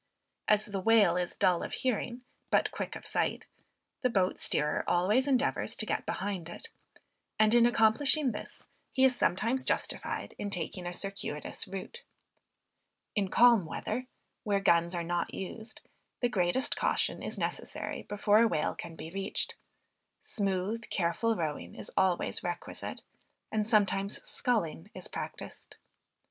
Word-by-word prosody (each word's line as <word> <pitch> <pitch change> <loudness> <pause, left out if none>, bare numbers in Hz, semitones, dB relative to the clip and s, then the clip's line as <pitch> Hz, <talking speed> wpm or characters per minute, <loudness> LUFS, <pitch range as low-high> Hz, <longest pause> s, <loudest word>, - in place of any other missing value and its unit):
As 215 0 +4
the 200 -2 -3
whale 205 -3 +5
is 180 -1 -1
dull 185 -3 +3
of - - -5
hearing, 245 0 -2 0.3
but - - +3
quick - - -4
of - - -9
sight, - - -1 0.6
the 250 - +3
boat 190 -5 +1
steerer 150 0 +1
always 205 +10 +3
endeavors 270 0 +1
to - - -2
get - - -2
behind 190 -4 -3
it; 460 - -9 0.7
and, 215 +1 +4
in 240 0 +7
accomplishing 245 +5 +4
this, 210 - -8 0.3
he 260 - +3
is 260 -1 +4
sometimes 230 +7 +1
justified - - -1
in 205 - -2
taking 180 -1 -3
a - - -2
circuitous 195 -6 -4
rout. 195 - -7 1.1
In 200 -3 +1
calm 235 -5 +6
weather, 250 +9 -3 0.4
where 205 -3 +1
guns 170 -2 +3
are 170 - -1
not 175 0 -2
used, 220 +4 -7 0.4
the 245 - +2
greatest 190 +4 +1
caution - - 0
is - - -5
necessary - - -4
before 205 +1 +3
a 230 - +6
whale 155 -8 0
can 165 -1 -8
be 160 - -8
reached; 195 +1 -1 0.7
smooth 200 +2 -1
careful 195 +6 +1
rowing 155 -6 -3
is - - -7
always 185 -2 +2
requisite, 175 0 -5 0.5
and 215 0 0
sometimes 200 -2 +2
sculling 190 - -1
is - - -6
practiced. - - -8
200 Hz, 145 wpm, -31 LUFS, 175-230 Hz, 1.1 s, in